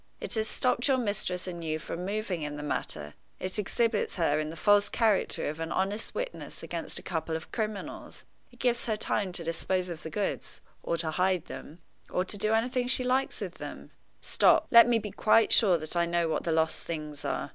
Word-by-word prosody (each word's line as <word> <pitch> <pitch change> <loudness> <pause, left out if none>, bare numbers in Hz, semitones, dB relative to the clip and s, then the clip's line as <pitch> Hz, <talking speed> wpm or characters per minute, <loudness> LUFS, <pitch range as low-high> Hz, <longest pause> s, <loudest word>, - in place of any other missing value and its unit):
It - - -4
has 220 -1 0
stopped 250 +2 +1
your 270 -2 +4
mistress 205 -6 -1
and 170 -2 -6
you 155 -1 -1
from 165 +2 -5
moving 205 -4 -2
in 150 -1 -4
the 145 - -6
matter; 75 - -3 0.3
it 185 +3 -3
exhibits 225 +1 0
her 155 -4 +2
in 155 0 -2
the 160 - -7
false 205 +4 +4
character 220 -4 +1
of 150 +2 -4
an 165 0 -3
honest 200 +3 -2
witness - - -5
against - - -3
a - - -2
couple 160 -2 -2
of 160 - -6
criminals; 215 -3 -5 0.3
it 245 - -18
gives 240 -1 0
her 220 - +1
time 200 -3 -1
to 170 - -5
dispose 180 +2 -1
of 165 -2 -6
the 160 - -6
goods, 205 +4 -3 0.2
or 170 - -1
to 160 -1 -1
hide 180 0 +1
them, 165 +3 -10 0.3
or 180 - 0
to 200 - -3
do 215 +2 +1
anything 245 +3 +1
she 255 0 +3
likes 255 +2 0
with - - -5
them. - - -8 0.3
Stop! - - +4
let 235 0 +9
me 240 -1 +4
be 210 -2 -4
quite 215 +2 +4
sure 190 -6 +6
that 155 +1 -4
I 170 0 +2
know 170 0 +1
what 160 - -1
the 170 - +1
lost 160 0 +1
things 150 -3 -5
are. - - -2
185 Hz, 215 wpm, -29 LUFS, 165-220 Hz, 0.3 s, let